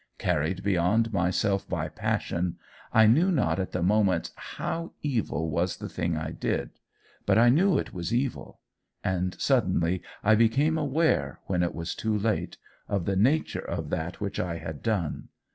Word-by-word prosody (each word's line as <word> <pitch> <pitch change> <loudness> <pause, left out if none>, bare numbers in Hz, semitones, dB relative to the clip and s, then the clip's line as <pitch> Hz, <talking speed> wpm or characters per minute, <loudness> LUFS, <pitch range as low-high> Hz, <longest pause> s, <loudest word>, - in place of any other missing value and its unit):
Carried 90 +2 0
beyond 100 +4 +2
myself 95 +2 +1
by - - -1
passion, 85 0 -2 0.3
I 110 0 +6
knew 155 - +5
not 140 - +1
at 95 - -2
the 90 - -1
moment 95 -2 +2
HOW 165 0 -5
evil 95 - -1
was - - 0
the - - -6
thing 85 -2 -2
I 80 0 -3
did. - - -2 0.6
But - - +4
I 120 +2 +6
knew 170 +6 +4
it - - -3
was 85 -2 -4
evil. 125 +2 -2 0.4
And 90 0 -1
suddenly 85 +2 +2 0.2
I 110 - +5
became 120 +8 +3
aware, 140 - +1
when 90 -2 0
it 85 - -1
was 85 0 -3
too 110 -1 -1
late, 105 0 -1 0.3
of 100 -4 -1
the 100 - 0
nature 135 +11 +2
of - - -4
that 80 +3 -3
which 100 -1 -3
I 85 -2 -2
had 80 -2 -7
done. 100 -9 -1
100 Hz, 165 wpm, -27 LUFS, 85-115 Hz, 0.6 s, I